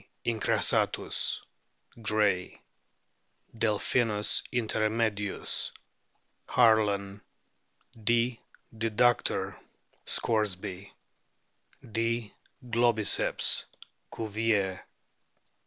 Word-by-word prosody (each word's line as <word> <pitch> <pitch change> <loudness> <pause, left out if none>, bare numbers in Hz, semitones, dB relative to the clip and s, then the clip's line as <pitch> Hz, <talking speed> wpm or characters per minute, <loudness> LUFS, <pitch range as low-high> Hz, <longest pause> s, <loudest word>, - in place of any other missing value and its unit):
incrassatus, 115 -2 +1 0.6
Gray; 105 -4 +1 1.0
Delphinus 110 0 +1
inter 110 -3 0
me 115 0 +1
dius, 100 -1 -2 0.8
Harlan; 105 -4 +3 0.8
D. 120 +1 +2 0.4
deductor, 115 +2 +1 0.5
Scoresby; 100 -3 -1 1.0
D. 115 -1 -1 0.3
globiccps. 115 -2 +3 0.5
Cuvier. 105 -3 0
110 Hz, 50 wpm, -29 LUFS, 105-115 Hz, 1.0 s, Harlan